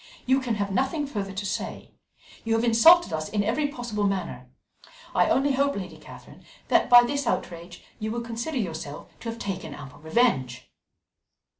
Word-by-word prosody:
"You 265 +1 +3
can 240 -3 -1
have 200 -1 -2
nothing 270 - 0
further 205 -8 -4
to 195 +1 -5
say. 195 - -4 0.5
You 225 0 +1
have 225 - +1
insulted 240 - +6
us 155 0 -3
in 205 -1 0
every 245 +8 0
possible 240 -7 -3
manner. 170 -10 -4 0.6
I - - +3
only 280 +1 +2
hope, 280 +1 +1
Lady 190 -2 -6
Catherine, - - -14 0.3
that - - +3
by 245 -1 +9
this 280 +1 -2
outrage 170 -3 -4 0.2
you 215 - -3
will 235 +1 -3
consider 235 +6 -4
yourself 160 - -5
to 230 - -5
have 230 - -5
taken 185 -8 -5
ample 135 -3 -11
revenge." 145 - 0
225 Hz, 170 wpm, -26 LUFS, 180-250 Hz, 0.6 s, by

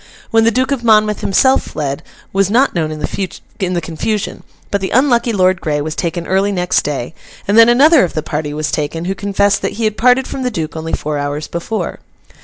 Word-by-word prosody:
When 225 0 +4
the - - +5
Duke 255 +4 0
of 265 -4 -1
Monmouth 215 -2 +3
himself 260 +7 +3
fled, 140 -2 -4 0.3
was 195 0 +2
not 250 +6 +3
known 160 -3 -1
in 155 - -5
the 185 0 -4
confusion; 170 +6 -3 0.3
but 200 - 0
the 190 - -2
unlucky 245 -1 +2
Lord 185 -3 +2
Grey 150 -2 -1
was 155 +1 -3
taken 170 0 -3
early 195 +3 +1
next 180 -1 +1
day, 145 -1 -4 0.3
and 200 - +2
then 230 +1 +8
another 285 - +6
of 180 - -2
the 155 - -2
party 150 -1 -3
was 150 0 -3
taken, 155 +3 -3
who 190 - -1
confessed 200 0 +1
that - - -2
he 230 - -4
had 215 -1 0
parted 250 +3 +3
from 270 - -5
the 250 - 0
Duke 165 -9 -4
only 160 0 -5
four 150 -1 -2
hours 145 +1 -3
before. 170 +6 -4
195 Hz, 210 wpm, -16 LUFS, 160-225 Hz, 0.3 s, then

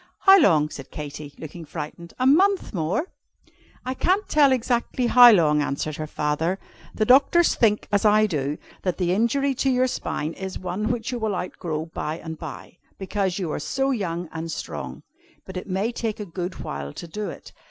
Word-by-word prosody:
"How 390 0 +8
long?" 150 - +4
said 135 - -9
Katy, 150 -1 -8
looking 165 +2 -9
frightened: 160 +2 -8
"a 255 - 0
month 370 +7 +3
more?" 180 - -1 0.8
"I 255 - -2
can't 375 +9 +1
tell 290 -3 +4
exactly 245 0 0
how 245 0 +9
long," 155 -7 +4
answered 145 +1 -3
her 155 -1 -4
father. 155 +5 -1 0.4
"The 215 - +1
doctors 280 +8 +5
think, 210 -3 +2
as 205 -1 +2
I 215 0 +5
do, 150 -6 -2 0.2
that 180 -2 -1
the 180 -1 +1
injury 270 +7 +1
to 270 +1 0
your 255 0 +3
spine 160 -10 -3
is 190 +1 -6
one 185 +4 -3
which 235 -1 -3
you 245 - -3
will 220 -3 -1
outgrow 165 -3 -4
by 160 -1 -4
and 160 -1 -7
by, 160 +2 -9 0.2
because 190 -1 -2
you 180 -6 -2
are - - -2
so 270 - -1
young 175 -7 -2
and 165 0 -5
strong. - - -6 0.4
But 190 - -10
it 185 - -6
may 195 +5 0
take 225 -3 -3
a 210 - -4
good 180 0 -5
while 70 0 -5
to 170 - -8
do 210 +5 -4
it. - - -11
190 Hz, 190 wpm, -24 LUFS, 160-245 Hz, 0.8 s, how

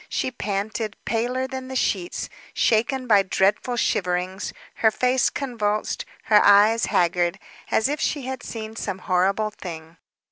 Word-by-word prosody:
She 260 - -1
panted, 210 -1 -3
paler 245 +3 0
than 260 0 -6
the 260 - -6
sheets, 185 -8 -1 0.3
shaken 245 +4 +2
by 210 -5 +5
dreadful 195 +5 +1
shiverings, 180 -1 -1 0.3
her 220 - +4
face 250 +4 +2
convulsed, 215 -6 -2 0.2
her 210 -1 +5
eyes 210 +3 +6
haggard, 175 0 +1 0.3
as 220 - +2
if 295 +1 -2
she 290 -3 -1
had 260 0 -5
seen 220 -2 -7
some 190 - -3
horrible 195 +4 +1
thing. 165 -4 -9
215 Hz, 140 wpm, -24 LUFS, 190-250 Hz, 0.3 s, eyes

